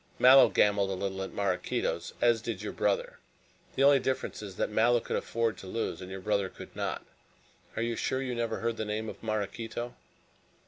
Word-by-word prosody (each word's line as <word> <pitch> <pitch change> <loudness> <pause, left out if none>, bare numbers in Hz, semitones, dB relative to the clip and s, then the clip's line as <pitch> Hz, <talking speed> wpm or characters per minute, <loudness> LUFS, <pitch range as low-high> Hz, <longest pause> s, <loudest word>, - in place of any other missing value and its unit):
"Mallow 130 -1 +8
gambled 100 0 +3
a 95 - -1
little 95 0 -3
at 95 - -4
Maraquito's, 95 -3 -1
as 120 -2 +4
did 110 -4 -4
your 105 - -4
brother. 100 -1 0 0.6
The 135 - +2
only 140 0 +7
difference 130 -3 -2
is 100 -3 -8
that - - -1
Mallow 120 +3 +4
could - - -4
afford 115 -1 -1
to 95 - -10
lose 115 +1 -3
and 90 - -8
your 95 0 -6
brother 100 -1 0
could - - -12
not. - - -3 0.7
Are 110 - -1
you 115 0 -1
sure 130 - -1
you 130 -2 -2
never 115 -1 -2
heard 115 0 -1
the - - -2
name 105 +1 -3
of - - -10
Maraquito?" 110 +2 -3
110 Hz, 195 wpm, -30 LUFS, 100-120 Hz, 0.7 s, Mallow